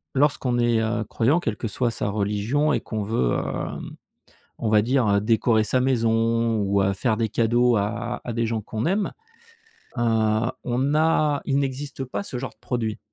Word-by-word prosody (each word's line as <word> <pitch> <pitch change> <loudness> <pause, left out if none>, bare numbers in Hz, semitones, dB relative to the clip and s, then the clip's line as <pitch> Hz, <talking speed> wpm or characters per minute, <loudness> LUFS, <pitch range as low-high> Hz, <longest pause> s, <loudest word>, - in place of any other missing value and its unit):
lorsqu'on 135 -3 +2
est, 120 -1 +2
heu, 110 0 -1
croyant, 125 +10 +2
quelle 115 -11 -3
que - - -3
soit 120 +3 -1
sa 105 - -2
religion 105 +9 0
et - - 0
qu'on 110 -2 -4
veut, 100 - 0
heu, - - -1 1.2
on 115 - -1
va 105 -1 +4
dire 115 -4 +2
décorer 110 +1 +2
sa 125 +4 +1
maison 115 -2 +1
ou, 100 0 +2
heu, 95 0 +2
faire 110 +3 0
des 115 0 0
cadeaux 120 +2 +2
à 115 +4 -2
à 120 - -4
des 115 0 0
gens 110 0 -1
qu'on 110 +1 -3
aime, 195 +4 0 0.9
heu, - - +1 0.6
on 130 +4 0
a 155 -2 +2
il 140 0 +1
n'existe 135 0 -3
pas 130 - -4
ce 135 -11 -5
genre 130 - -5
de - - -29
produit. 115 -4 -2
115 Hz, 185 wpm, -24 LUFS, 110-130 Hz, 1.2 s, va